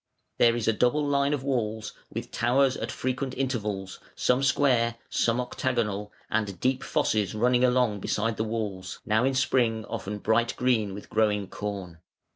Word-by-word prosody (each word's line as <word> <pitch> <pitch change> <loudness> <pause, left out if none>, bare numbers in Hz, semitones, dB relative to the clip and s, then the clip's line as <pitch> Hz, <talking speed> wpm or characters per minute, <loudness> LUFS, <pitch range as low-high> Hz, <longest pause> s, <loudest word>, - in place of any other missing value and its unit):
There 115 -1 +5
is 120 -2 -2
a 115 - +4
double 125 +7 +2
line 140 0 +2
of 145 -3 -1
walls 110 -5 -2 0.2
with - - -6
towers 130 +2 +2
at - - -4
frequent 130 0 -3
intervals, 105 -8 -2 0.2
some 125 +1 +2
square, 130 -4 +3 0.2
some 115 +1 +2
octagonal, 115 -5 -2 0.2
and 105 -4 -1
deep 130 0 0
fosses 105 -1 0
running 125 +3 +3
along 125 -4 +3
beside 110 +3 -1
the 110 - 0
walls, 105 -5 -4
now 110 0 +2
in 135 0 +1
spring 120 -5 +1
often 105 +2 -4
bright 115 +3 +1
green 110 -6 +1
with 100 - -10
growing 105 -2 +1
corn. 95 -5 -5
115 Hz, 160 wpm, -27 LUFS, 105-130 Hz, 0.2 s, There